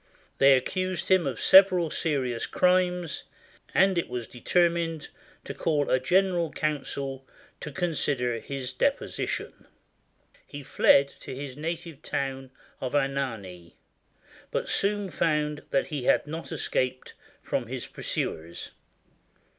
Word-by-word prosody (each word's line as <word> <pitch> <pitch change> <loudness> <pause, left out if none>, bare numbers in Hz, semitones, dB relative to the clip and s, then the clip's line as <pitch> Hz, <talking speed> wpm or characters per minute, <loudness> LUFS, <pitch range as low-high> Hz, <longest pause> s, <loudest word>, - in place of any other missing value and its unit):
They 135 0 +7
accused 185 +5 -2
him 185 -5 +4
of 125 -5 -3
several 185 -4 +6
serious 130 -7 -1
crimes, 180 -3 +1 0.5
and 190 -2 +4
it - - -3
was 125 -1 -4
determined 170 +4 0 0.3
to - - -6
call 150 -3 0
a 130 - +4
general 175 +3 +2
council 140 -3 -3 0.3
to 150 - -6
consider 140 -7 -1
his 135 -1 -5
deposi 280 0 0
tion. - - -5 0.8
He 145 0 -8
filed 140 +1 +4
to - - -7
his 135 -1 -6
native 165 0 -5
town 135 -3 -3 0.3
of 130 +1 -3
Anagni, 115 -11 -2 0.7
but - - -2
soon 200 -1 0
found 150 -3 0
that 135 - +1
he 135 -4 -3
had - - +3
not 160 +3 -6
escaped 130 -4 -2 0.3
from - - -2
his - - -5
pursuers. 85 +2 -4
145 Hz, 125 wpm, -27 LUFS, 130-170 Hz, 0.8 s, They